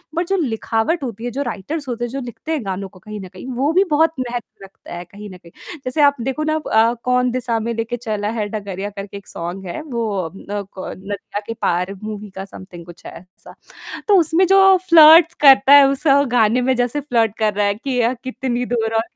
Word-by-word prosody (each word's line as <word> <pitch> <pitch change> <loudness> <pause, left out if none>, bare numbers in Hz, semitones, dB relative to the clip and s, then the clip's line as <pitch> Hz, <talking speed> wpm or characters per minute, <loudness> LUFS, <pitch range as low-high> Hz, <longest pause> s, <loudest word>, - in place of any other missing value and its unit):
But 340 +1 -1
जो - - +3
लिखावट 230 +4 -1
होती 230 -2 -6
है 245 - -3
जो 270 +4 -3
राइटर्स 280 +6 -5
होते 240 -1 -4
हैं - - -6
जो 275 - -4
लिखते 245 +6 -8
हैं 295 -9 -2
गानों 195 0 -4
को 185 - -18
कहीं 215 +2 -9
न 190 - -8
कहीं 185 +7 -10
वो 275 +5 +1
भी 375 +3 +4
बहुत 320 +2 +3
महत्व 240 -5 -6
रखता 195 - -13
है 175 - -6
कहीं 205 +3 -11
न 185 - -11
कहीं। 170 -1 -18 0.3
जैसे 255 +4 0
आप 285 -1 +5
देखो 270 +5 -2
ना 310 0 0 0.2
अ, 225 +2 +4
"कौन 250 0 +1
दिसा 240 -2 -1
में 230 +2 -3
लेके 230 +2 -3
चला 215 -3 -3
है 210 - -1
डगरिया" 200 -2 -5
करके 200 0 -8
एक 200 - -14
सॉन्ग 175 +3 -6
है 175 - -5
वो 240 -7 -3 0.2
अ, - - -23
न 205 +1 -5
क 185 - -6
नदिया 200 +1 -6
के 230 - -3
पार 180 +3 0
मूवी 210 -1 -6
का 190 - -6
सम्थिंग 185 -3 -12
कुछ 175 0 -15
है - - -7
ऐसा। 180 +1 -17 0.5
तो 410 - +6
उसमें 330 +3 +2
जो 390 +1 +5 0.3
फ्लर्ट्स 325 0 +8
करता 275 -3 +7
है 285 -1 +9
उस 275 +1 -2 0.3
गाने 235 0 +3
में 260 +1 +2
जैसे 245 +4 -1
फ्लर्ट 230 -6 0
कर 215 -1 +1
रहा 205 0 +1
है 200 - +1
कि 250 +3 -3
अ, 235 +1 +2
कितनी 255 -1 -3
दूर 225 -2 -1
और 225 - +2
230 Hz, 230 wpm, -19 LUFS, 205-270 Hz, 0.5 s, है